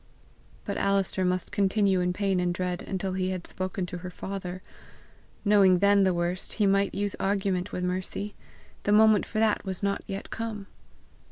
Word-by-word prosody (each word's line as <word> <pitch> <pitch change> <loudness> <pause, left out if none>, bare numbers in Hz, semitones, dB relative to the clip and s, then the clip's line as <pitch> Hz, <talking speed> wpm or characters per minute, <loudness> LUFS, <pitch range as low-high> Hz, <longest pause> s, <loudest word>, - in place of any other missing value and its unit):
But - - -3
Alister 195 -1 +1
must 180 -1 0
continue 200 -2 +2
in 180 0 +1
pain 195 0 0
and 180 0 +1
dread 180 0 -2
until 190 0 -3
he 185 0 -1
had 185 -2 -4
spoken 185 0 -3
to 180 0 -6
her 180 +1 -6
father. 185 0 -6 0.8
Knowing 200 -3 +6
then 200 +1 +4
the 190 - +3
worst, 175 +2 -1
he 210 - +1
might 195 0 +2
use 200 0 -1
argument 195 -1 0
with 180 - -3
Mercy; 185 +3 -2 0.5
the 205 - +1
moment 215 -1 +5
for 215 - -5
that 220 -1 +2
was 190 -1 -4
not 200 0 0
yet 195 +1 -6
come! 225 -3 -4
195 Hz, 175 wpm, -27 LUFS, 180-200 Hz, 0.8 s, Knowing